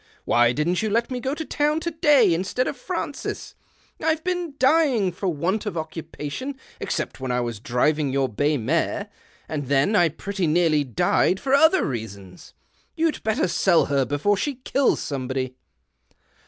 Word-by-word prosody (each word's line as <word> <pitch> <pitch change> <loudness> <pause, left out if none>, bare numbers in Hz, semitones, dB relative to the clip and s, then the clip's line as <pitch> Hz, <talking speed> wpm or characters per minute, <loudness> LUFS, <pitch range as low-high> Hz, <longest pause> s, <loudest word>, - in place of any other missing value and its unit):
Why 120 0 +4
didn't 155 +7 0
you 220 - -1
let 230 +4 0
me 250 - -2
go 265 +3 -2
to 320 - -5
town 300 +2 0
to 340 - -2
day 295 - +4
instead 190 +9 -1
of - - -3
Francis? - - -5 0.5
I've 320 0 +1
been 355 -5 -2
dying 260 - +3
for 190 +2 -4
want 185 +7 -1
of 190 - -3
occupation 160 - -6 0.2
except - - -3
when 130 -1 -3
I 125 - +1
was 120 -3 -4
driving 145 +4 +1
your 135 0 +1
bay 145 +6 0
mare, 165 - -1 0.4
and 145 -4 -4
then 140 - +2 0.2
[ - - -28
pretty 195 -4 -2
nearly 155 -2 +3
died 140 - +1
for 270 - -1
other 320 +6 +5
reasons. 100 -7 -7 0.4
You'd 325 -1 +1
3etter 220 +8 +1
sell 175 -4 +3
her 135 -1 +3
before 145 +10 +1
she 285 +6 -2
kills 275 0 +2
somebody." 130 -2 -3
175 Hz, 165 wpm, -23 LUFS, -, 0.5 s, other